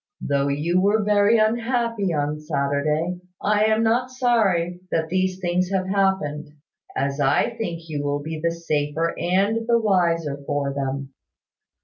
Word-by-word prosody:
Though 140 0 0
you 160 +6 +1
were 205 +2 +2
very 205 +2 +4
unhappy 230 -2 0
on 150 -1 -1
Saturday, 150 +3 -1 0.2
I 210 +1 +2
am 220 +1 +2
not 240 +3 +1
sorry 205 -9 +1
that 160 -1 -1
these 185 0 0
things 180 0 0
have 190 -1 0
happened, 190 -7 0 0.5
as 140 +1 -1
I 145 - +2
think 175 -8 -4
you 150 -2 -3
will 145 0 0
be 160 +1 -5
the 170 - +2
safer 165 -1 -1
and 200 +6 +1
the 235 -1 +4
wiser 170 -8 +1
for 140 -1 -1
them. 135 0 -4
175 Hz, 145 wpm, -23 LUFS, 150-210 Hz, 0.5 s, very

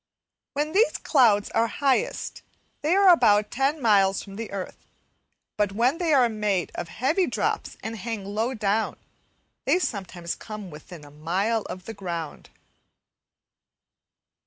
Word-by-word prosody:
When 295 +2 -1
these 430 +7 +3
clouds 225 -8 +3
are 230 - +2
highest 280 - -1 0.4
they 315 +5 +2
are 395 -1 +6
about 210 -8 +3
ten 275 +5 0
miles 200 -5 +3
from 195 -1 -11
the 225 +1 -5
earth, 195 -2 -7 0.7
but 205 -2 +1
when 245 +9 +2
they 340 -3 +1
are 260 -4 +5
made 210 -5 -1
of 175 - -5
heavy 310 - +1
drops 220 -4 -2
and 220 +1 -4
hang 220 -2 -5
low 220 +6 -2
down, 215 0 0 0.7
they - - +4
sometimes 185 - -3
come 210 -4 -8
within 150 +1 -11
a 145 - -14
mile 185 +9 0
of 185 0 -7
the 225 - -6
ground. 170 -6 -6
215 Hz, 140 wpm, -25 LUFS, 195-260 Hz, 0.7 s, are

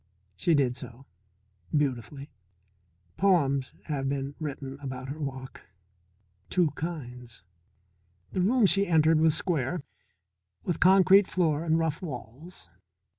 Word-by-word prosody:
She 165 - +2
did 130 -4 +1
so. 125 +1 -10 0.7
Beautifully. 140 0 -3 0.9
Poems 140 -9 +2
have 135 -3 -2
been 140 0 -3
written 140 -3 -6
about 130 -2 -6
her 150 +3 -6
walk. 130 -3 -6 0.9
Two 175 -5 +2
kinds. 125 - -7 0.9
The 185 - -1
room 230 +4 +3
she 200 +1 +3
entered 160 -1 +4
was 160 -1 +4
square, 160 -2 -1 0.8
with 175 - -2
concrete 190 +1 +6
floor 160 -4 0
and 160 -1 +2
rough 160 -1 -1
walls. 135 - -8
150 Hz, 115 wpm, -28 LUFS, 135-175 Hz, 0.9 s, concrete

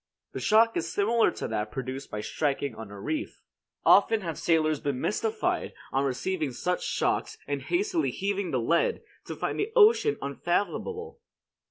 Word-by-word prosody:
The - - -4
shock 225 +1 +4
is 165 0 -2
similar 225 +3 +3
to - - -5
that 105 0 -2
produced 130 +1 -5
by 105 - -4
striking 140 0 -1
on 110 -2 -9
a 100 0 -9
reef. 310 - -4 0.4
Often 225 -1 +5
have 165 -4 -4
sailors 155 -3 +2
been 140 -3 -2
mystified, 435 - -1 0.2
on 135 +1 +1
receiving 150 +2 -2
such 180 +8 -1
shocks - - -1
and 145 -1 -3
hastily 355 - 0
heaving 200 -1 -2
the 130 - 0
lead, 165 +9 +1 0.2
to - - -6
find - - -3
the 410 +2 -1
ocean 440 -1 +5
unfathomable. 205 - -2
175 Hz, 160 wpm, -28 LUFS, -, 0.4 s, Often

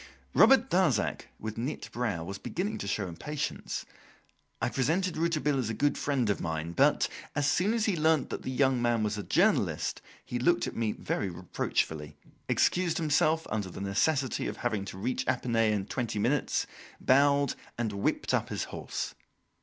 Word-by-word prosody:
Robert 270 0 +6
Darzac, 160 - +2
with 110 +1 -5
knit 130 +6 -4
brow, 110 -9 -2
was 95 +3 -6
beginning 200 +5 -3
to 100 - -4
show 100 -1 -1
impatience. 150 - -4 0.7
I - - +1
presented 165 +8 0
Rouletabille 155 -4 +1
as 120 -4 -1
a 110 - -2
good 145 0 +2
friend 135 -5 0
of - - -2
mine, 80 0 -3
but, 85 - +3 0.3
as 145 - +1
soon 180 +8 +2
as 225 -2 +1
he 205 - +1
learnt 160 -2 +2
that - - -3
the - - -5
young 130 -1 +2
man 120 -2 +2
was 105 0 -1
a - - -4
journalist, - - +1 0.2
he 120 - -3
looked 175 +8 +3
at - - -5
me 115 -2 0
very 100 - -2
reproachfully, 80 -4 -2 0.3
excused 180 -2 +2
himself, 160 0 +2
under 105 -4 -1
the 90 - -8
necessity 130 +8 +1
of - - -5
having 110 -5 -1
to 95 - -7
reach 125 +6 -1
Epinay 115 -3 +2
in 100 -2 -1
twenty 115 -1 -3
minutes, 125 +7 +1 0.3
bowed, 140 +1 +4 0.2
and 115 -3 -1
whipped 100 - 0
up - - +1
his - - -2
horse. - - -4
125 Hz, 175 wpm, -29 LUFS, 105-150 Hz, 0.7 s, Robert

